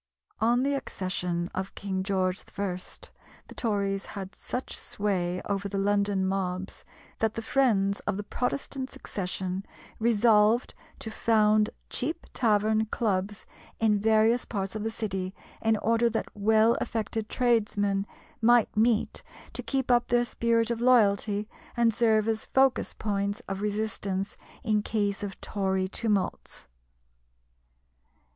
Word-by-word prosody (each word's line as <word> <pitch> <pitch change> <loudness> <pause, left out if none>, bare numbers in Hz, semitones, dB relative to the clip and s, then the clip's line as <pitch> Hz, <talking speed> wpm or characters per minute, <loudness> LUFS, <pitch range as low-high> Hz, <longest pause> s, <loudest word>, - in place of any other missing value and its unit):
On 240 +3 +3
the 280 +1 +1
accession 180 -8 -3
of 190 +1 -4
King 190 -1 -3
George 190 -1 0
I. 200 -3 -1 0.7
the - - -11
Tories 200 -3 -1
had 195 -1 -7
such 250 - -4
sway 180 -3 -1
over 200 0 -2
the 200 - -3
London 200 -1 +1
mobs, 190 0 -3 0.4
that 220 -1 +1
the 225 - -3
friends 210 -6 +2
of 205 -2 0
the 205 - -3
Protestant 260 +4 -3
succession 185 -2 -4 0.4
resolved 225 0 +4 0.2
to 220 - -6
found 215 -1 +3 0.2
cheap 320 +6 -2
tavern 220 -1 +2
clubs 205 -2 -1 0.3
in 215 -2 +3
various 220 +3 +3
parts 195 -3 -3
of 215 - -3
the 225 - 0
City 195 -4 -4 0.3
in 225 -1 +3
order 230 +2 +2
that 225 - -4
well 220 +2 +4
affected 225 -1 -2
tradesmen 205 -5 +1 0.3
might 240 0 +4
meet 220 0 +2 0.3
to - - -3
keep 265 -2 -1
up 240 0 +4
their 240 0 +3
spirit 230 -1 +1
of 235 0 -2
loyalty, 210 -4 +3 0.3
and 235 -1 +4
serve 220 -1 +3
as 220 -1 -1
focus 265 -1 +2
points 200 -1 -1
of 195 0 -4
resistance 205 -2 -2 0.3
in 215 -2 +2
case 205 -2 -1
of 200 -1 -5
Tory 190 -2 -1
tumults. 205 - -2
210 Hz, 130 wpm, -28 LUFS, 195-230 Hz, 0.7 s, resolved